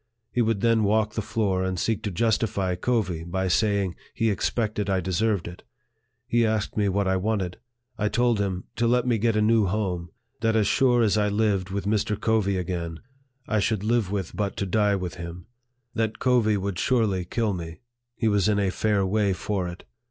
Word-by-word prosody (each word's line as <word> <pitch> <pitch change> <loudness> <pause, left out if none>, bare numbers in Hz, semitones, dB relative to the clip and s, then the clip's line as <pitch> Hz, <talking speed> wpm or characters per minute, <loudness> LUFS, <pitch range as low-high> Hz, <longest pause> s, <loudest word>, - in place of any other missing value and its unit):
He 120 - +1
would 110 -3 +1
then 115 -2 +3
walk 105 +1 +2
the 110 - -1
floor, 105 -4 0
and 95 -1 -2
seek 110 +2 0
to 110 - -2
justify 100 -1 0
Covey 95 -4 -1
by 95 +3 -2
saying 100 0 +1 0.2
he 115 -1 +2
expected 105 0 -1
I 95 -1 +2
deserved 95 +2 0
it. 85 +1 -9 0.6
He 120 -1 +2
asked 110 -1 0
me 105 -2 +2
what 100 +1 0
I 95 0 +2
wanted. 95 -3 -1 0.4
I 105 - +1
told 120 -1 +2
him, 95 -2 -1
to 120 +1 +2
let 125 +1 +2
me 120 -3 +1
get 115 +1 +1
a 105 - +3
new 110 -2 +3
home; 90 -4 -2 0.3
that 110 0 +1
as 110 -2 +3
sure 125 -1 +3
as 110 -1 +2
I 105 0 +2
lived 100 -3 +1
with 100 +1 -3
Mr. 105 0 0
Covey 105 -4 +1
again, 85 -2 -3 0.5
I 110 - +1
should 105 0 0
live 115 -2 +1
with 100 -3 -3
but 100 -1 -2
to 100 - -1
die 105 +1 +2
with 90 -3 -4
him; 85 +1 -7 0.5
that 110 -2 -1
Covey 120 -5 +2
would 100 -2 -3
surely 110 -7 +1
kill 105 +4 -1
me; 85 +2 -7 0.3
he 115 - 0
was 105 -1 +2
in 105 - +2
a 100 -2 +1
fair 105 -1 +1
way 100 0 +1
for 95 0 -2
it. 90 +1 -8
105 Hz, 200 wpm, -25 LUFS, 95-110 Hz, 0.6 s, then